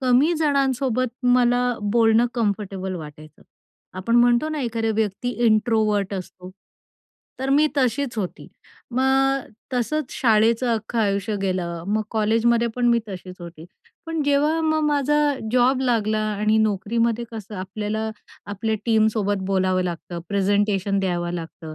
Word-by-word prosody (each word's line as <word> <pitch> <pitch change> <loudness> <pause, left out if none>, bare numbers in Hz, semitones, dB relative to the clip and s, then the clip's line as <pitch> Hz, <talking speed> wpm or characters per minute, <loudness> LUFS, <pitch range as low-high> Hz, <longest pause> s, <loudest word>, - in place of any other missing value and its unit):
कमी 260 +5 +3
जणांसोबत 265 -4 +1 0.2
मला 245 0 +3 0.3
बोलणं 230 0 +4
कम्फर्टेबल 200 -4 -2
वाटायचं. 155 -2 -11 0.6
आपण 230 +6 +1
म्हणतो 240 +4 +4
ना, 310 -1 -3
एखाद्या 225 -3 -1
व्यक्ती 220 +2 -1 0.2
इंट्रोवर्ट 215 -2 +2
असतो, 185 -1 -8 0.9
तर 265 +1 -1
मी 295 +3 +4
तशीच 255 -1 0
होती. 185 -4 -5 0.4
मग 270 +1 +1 0.3
तसंच 255 +3 -1
शाळेचं 225 0 +3
अख्खं 225 +2 -4
आयुष्य 205 0 0
गेलं, 175 -3 -2
मग 215 +1 +1
कॉलेजमध्ये 230 +2 +2
पण 245 -1 +1
मी 235 0 +4
तशीच 185 -1 -8
होती. 170 -2 -10 0.4
पण 325 -1 -2
जेव्हा 290 +3 +2
मग 315 -1 +1
माझा 295 0 +1 0.4
जॉब 255 +1 +3
लागला 220 -4 +1
आणि 215 +1 +1
नोकरीमध्ये 220 +3 0
कसं, 215 -1 -8
आपल्याला 210 +3 -3 0.4
आपल्या 210 +2 -2
टीमसोबत 215 -3 +1
बोलावं 185 -1 +1
लागतं, 175 0 -5
प्रेझेंटेशन 200 0 +1
द्यावं 175 -2 -1
लागतं, 165 -2 -7
220 Hz, 125 wpm, -22 LUFS, 195-245 Hz, 0.9 s, बोलणं